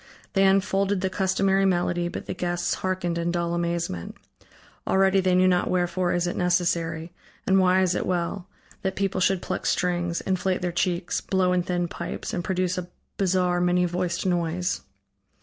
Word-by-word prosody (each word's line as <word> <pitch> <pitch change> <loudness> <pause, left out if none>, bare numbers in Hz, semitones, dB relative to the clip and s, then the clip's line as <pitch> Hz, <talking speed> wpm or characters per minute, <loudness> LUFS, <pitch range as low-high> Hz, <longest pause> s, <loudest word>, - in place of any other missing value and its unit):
They 195 -1 +4
unfolded 195 0 +2
the 190 -1 -1
customary 195 0 +2
melody 175 -2 +1
but - - -6
the - - -4
guests 175 -1 -1
hearkened 185 -2 -2
in 170 0 -1
dull 170 -1 -1
amazement. 170 - -2 0.7
Already 195 0 +4
they 185 -1 +2
knew 185 0 +5
not 180 -1 +2
wherefore 180 0 0
is 175 0 +1
it 175 - -2
necessary, 170 -2 0 0.3
and 190 0 +4
why 185 0 +4
is 180 -1 +2
it - - -2
well, 180 +1 -2 0.3
that 190 -1 -2
people 195 -1 -1
should 185 0 +2
pluck - - -3
strings, 175 -1 0
inflate 185 -1 -1
their 180 - 0
cheeks, 175 0 -1
blow 185 -1 +1
in 180 - +2
thin 175 -1 -1
pipes, - - -5
and 175 - -2
produce 185 -1 -1
a 180 - -6 0.3
bizarre, 180 -2 +1
many 180 0 +3
voiced 175 0 -2
noise. 175 0 0
180 Hz, 170 wpm, -25 LUFS, 175-185 Hz, 0.7 s, knew